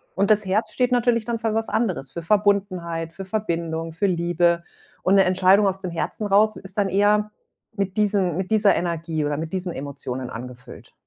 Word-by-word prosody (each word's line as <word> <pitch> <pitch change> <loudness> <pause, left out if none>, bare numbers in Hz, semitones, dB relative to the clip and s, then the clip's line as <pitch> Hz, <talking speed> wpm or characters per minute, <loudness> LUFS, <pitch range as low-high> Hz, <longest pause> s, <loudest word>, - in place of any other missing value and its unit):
Und 200 +1 +1
das 210 -1 +4
Herz 195 +4 0
steht 250 0 0
natürlich 240 -2 +2
dann 235 -1 -2
für 225 -1 -1
was 225 0 -1
anderes, 190 - -1
für 170 - -6
Verbundenheit, 185 -4 0
für 195 - -7
Verbindung, 165 -5 -3
für 165 +5 -1
Liebe. 170 -1 +1 0.4
Und 190 - +3
'ne 195 - +6
Entscheidung 185 +2 +4
aus 190 0 -2
dem 185 - -3
Herzen 190 +5 -3
raus 210 +2 +4
ist 190 +1 -8
dann 200 -2 +1
eher 210 +2 +2 0.4
mit 195 -2 -3
diesen 200 -5 +1
mit 190 +2 -4
dieser 210 -2 +4
Energie 165 -3 -2
oder 145 0 -1
mit 160 +1 -5
diesen 185 -2 -3
Emotionen 130 -2 -5
angefüllt. 125 +1 -10
190 Hz, 190 wpm, -23 LUFS, 170-210 Hz, 0.4 s, ne